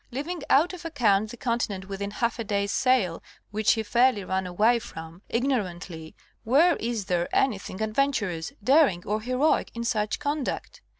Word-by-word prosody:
Leaving 295 +8 -4
out 320 +7 +4
of 360 -1 -8
account 220 -10 +1
the 240 - -9
continent 230 -7 -2
within 200 0 -4
half 235 +3 -2
a - - -1
day's 200 -1 -1
sail 230 -11 +2 0.3
which 215 0 +3
he 220 - -2
fairly 240 -1 +3
ran 190 0 -2
away 215 +7 +3
from, 165 -6 -10
ignorantly, 185 -10 -2 0.3
where 295 +10 +4
is 230 -3 -3
there 175 -2 0
any 245 -7 +2
thing 190 0 -8
adventurous, 215 -8 -1
daring 260 - +4
or 210 +2 -1
heroic 255 +6 +1
in 235 - -3
such 215 -3 0
conduct 290 -1 -3
220 Hz, 165 wpm, -26 LUFS, 195-260 Hz, 0.3 s, out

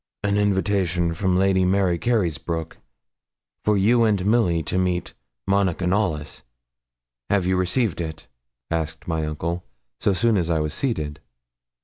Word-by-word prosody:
'An 100 0 +1
invitation 95 -4 +1
from 90 +1 +1
Lady 95 0 +3
Mary 90 -2 +2
Carysbroke 85 - -1 0.9
for 105 -1 +2
you 115 +5 +4
and 100 -4 +2
Milly 100 -7 +2
to 90 +4 -1
meet 90 -1 -1 0.3
Monica 95 -2 +1
Knollys; 90 -6 -1 0.9
have 100 -3 +2
you 95 +1 +2
received 95 +1 0
it?' 80 -1 -6 0.5
asked 80 -1 -3
my 80 -2 -1
uncle, 85 +3 -3 0.4
so - - +2
soon 105 +4 +2
as 85 -2 0
I 80 -2 +2
was 75 0 -1
seated. 75 - -1
90 Hz, 135 wpm, -23 LUFS, 85-100 Hz, 0.9 s, you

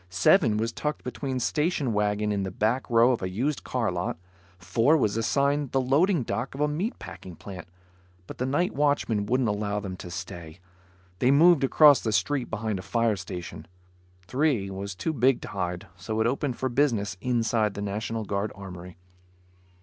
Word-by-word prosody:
Seven 105 - +4
was 115 +2 -1
tucked 150 +4 -3
between 130 +1 -3
station 150 -2 0
wagons 105 0 0
in 100 - -1
the 95 - -2
back 110 +7 -1
row 120 +1 +5
of 120 - -1
a 95 - -2
used 130 +10 -2
car 115 -6 -1
lot. 90 -1 -3 0.4
Four 115 - +2
was 110 -8 +1
assigned 140 +4 +1
the 135 - +3
loading 145 +5 +2
dock 125 +3 -3
of 140 - -5
a 150 - +3
meat 175 - -2
packing 90 -2 -10
plant, 90 0 -9 0.6
but - - -10
the 130 - 0
night 170 +7 0
watchman 140 -8 +1
wouldn't 125 +2 +1
allow 105 0 -1
them 95 -2 -6
to 90 - -8
stay. 85 -1 -8 0.6
They 125 - +3
moved 155 +2 +6
across 145 0 +6
the 110 - -1
street 120 +7 0
behind 110 -2 -2
a - - -5
fire 115 +2 +1
station. 90 -4 -7 0.6
Three 125 -5 0
was 100 0 -5
too 160 - -2
big 130 -1 +3
to - - -7
hide, 90 -2 -3
so 110 +5 -4
it 110 - +2
opened 130 +1 -1
for 130 - -1
business 120 -7 +1
inside 115 -3 +1
the 100 - -4
National 110 +2 -3
Guard 100 +1 -2
Armory. 90 -2 -10
115 Hz, 180 wpm, -26 LUFS, 100-135 Hz, 0.6 s, moved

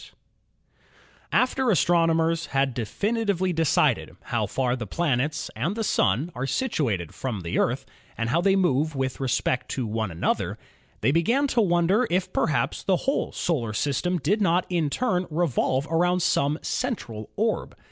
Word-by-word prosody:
88 - - -13 1.2
ASTRONOMY - - +4
After 255 0 -1
astronomers 165 -1 +2
had 135 -1 +1
definitely 195 - -1
decided 160 -3 +1
how - - -1
far 125 -2 0
the 120 -4 -5
planets 150 - -1
and 150 - -1
the 225 - -2
Sun 145 - +1
are 125 +2 -3
situated 125 - -1
from 120 -7 -4
the 85 -1 -2
Earth - - 0 0.3
and 115 +1 -1
how 170 +5 +2
they 195 +1 +3
move 155 -5 +1
with 130 -1 -2
respect 130 -1 0
to 130 - -2
one 110 -1 -2
another, 85 -1 -1 0.4
they 120 - +3
began 230 - +2
to 240 - +2
won 175 -4 +2
der 215 +8 +3
if 180 +1 -1
perhaps 150 - 0
the 190 - +2
whole 275 - 0
solar 120 -11 -1
system 145 +9 0
did 180 +9 0
not 180 -1 +2
in 170 -5 0
turn 185 - 0
re 165 +3 +1
volve 130 -1 0
around 180 +2 +2
some 145 +2 +2
central 120 - -3
orb. 220 +1 -1
165 Hz, 165 wpm, -25 LUFS, 130-185 Hz, 1.2 s, ASTRONOMY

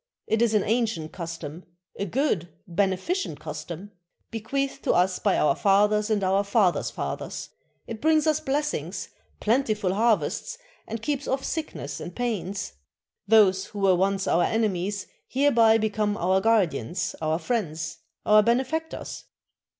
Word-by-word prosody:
It 220 +1 +1
is 230 -2 +3
an 205 - +3
ancient 220 -8 0
custom, 165 -1 -7 0.3
a 200 - -3
good, 205 - 0 0.2
beneficent 195 - -1
custom, 175 +5 -7 0.4
bequeathed 270 +5 -2
to - - +3
us 180 +1 +2
by 200 - +2
our 145 -2 +3
fathers 210 +2 +3
and 210 -2 +1
our 190 +2 +2
fathers' 200 -3 +2
fathers; - - -5 0.4
it 225 -1 -7
brings 315 0 +3
us 310 -1 +2
blessings, 295 0 -2 0.3
plentiful 215 -5 +1
harvests, 225 - +1 0.3
and 225 0 -5
keeps 290 +2 -2
off 270 0 -1
sickness 145 - -4
and 175 - -7
pains. 205 -5 -3 0.5
Those 195 -3 +5
who 205 - -8
were 195 -1 +5
once 195 +1 +1
our 170 - +3
enemies 200 -2 0 0.2
hereby 235 -5 +4
become 210 -1 0
our 185 +2 +2
guardians, 180 - +1
our 155 0 +1
friends, 165 -7 -3 0.3
our 215 0 +7
benefactors." 265 +8 -1
210 Hz, 135 wpm, -26 LUFS, 185-235 Hz, 0.5 s, our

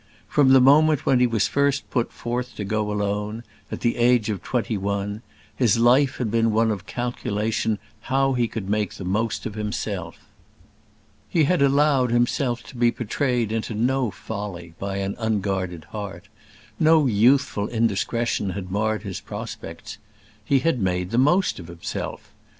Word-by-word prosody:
From 145 -3 +3
the 135 0 +7
moment 150 +3 +5
when 130 -2 +4
he 125 - +4
was 110 -4 +1
first 140 0 +1
put 120 -3 0
forth 125 +1 -4
to 105 - -4
go 105 +1 -1
alone 105 +2 -2 0.3
at - - -5
the 120 - +1
age 120 -2 +3
of 100 -5 -4
twenty 120 -1 -1
one 100 +1 -2 0.3
his 120 -4 +3
life 130 +4 +4
had 115 -5 -2
been 115 0 +2
one 110 0 +2
calculation 110 -2 -1 0.3
how 135 0 +2
he 120 -2 +1
could 110 -4 -6
make 105 -1 -1
the 95 - -7
most 105 +4 -1
of 110 - -4
himself. 105 0 -4 1.1
He 165 - +3
had 170 +1 +2
allowed 140 -2 +3
himself 120 +1 +1
to - - -13
be 120 0 +3
betrayed 120 -1 -1
into 110 0 -2
no 125 +2 +1
folly 100 -4 -7
by 100 0 -3
an 100 0 -2
unguarded 95 -6 -1
heart; 100 -4 -7 0.5
no 160 -2 +5
youthful 120 -1 +3
indiscretion 115 -1 0
had 95 -1 -5
marred 110 +2 0
his 95 -2 -5
prospects. 105 - -8 0.4
He 135 -2 +2
had 165 -3 +1
made 90 -1 -1
the 115 - +2
most 175 - +3
of 85 - -9
himself. 85 -1 -6
115 Hz, 160 wpm, -23 LUFS, 100-125 Hz, 1.1 s, the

